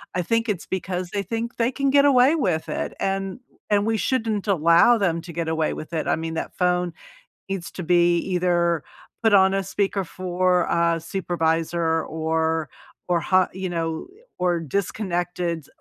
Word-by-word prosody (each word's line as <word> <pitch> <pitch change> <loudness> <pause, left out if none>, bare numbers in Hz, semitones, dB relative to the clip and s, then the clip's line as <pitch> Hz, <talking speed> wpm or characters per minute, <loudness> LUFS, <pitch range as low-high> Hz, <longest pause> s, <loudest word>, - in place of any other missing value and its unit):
I 180 - +1
think 230 +6 0
it's 200 -5 -2
because 185 -1 -3
they 200 +1 -2
think 230 +4 -4
they 235 +1 +1
can 275 +1 0
get 280 +1 +5
away 270 +2 +5
with 180 - -1
it, - - -3
and 195 +1 -2 0.3
and 205 -1 +2
we 225 0 +1
shouldn't 220 -3 -1
allow 170 +5 +5
them 175 -6 +1
to 170 0 -10
get 165 0 -2
away 160 -1 0
with 155 - -8
it. 160 -2 -2
I - - +3
mean, 160 0 -4
that - - -4
phone 180 -1 +1 0.6
needs 195 -3 -4
to - - -7
be 175 0 +4
either 175 -3 +1 0.4
put 225 -2 +4
on 190 -1 +6
a 195 - 0
speaker 195 +1 -1
for 180 0 0
a 170 0 +1
supervisor 165 -2 0
or 160 0 -1 0.4
or 175 -1 +3
how 185 +3 +3
you 190 0 -4
know 165 - -3 0.3
or 175 -1 +1
disconnected 175 -2 -2
180 Hz, 170 wpm, -23 LUFS, 165-195 Hz, 0.6 s, on